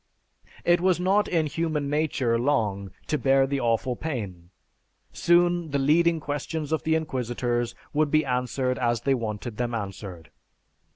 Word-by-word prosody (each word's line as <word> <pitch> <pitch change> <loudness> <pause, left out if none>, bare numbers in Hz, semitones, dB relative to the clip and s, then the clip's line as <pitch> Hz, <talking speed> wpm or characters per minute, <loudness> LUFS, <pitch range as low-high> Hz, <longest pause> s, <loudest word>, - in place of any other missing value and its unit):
It 175 0 +4
was 185 -1 +2
not 195 +3 +2
in 165 -3 +1
human 155 -1 -2
nature 140 -6 0
long 105 -7 0 0.2
to 150 - -1
bear 135 0 +4
the 140 +1 -1
awful 120 +1 0
pain; 100 - -5 0.6
soon 175 -1 +3
the 140 - 0
leading 165 +4 +3
questions 150 +1 -4
of 160 - +1
the 160 0 +1
inquisitors 120 -5 -2 0.2
would 155 0 +2
be 155 +1 +2
answered 125 0 -1
as 120 -1 +1
they 135 - +2
wanted 110 -2 -4
them 120 -1 -1
answered. 95 -6 -7
135 Hz, 150 wpm, -26 LUFS, 120-160 Hz, 0.6 s, It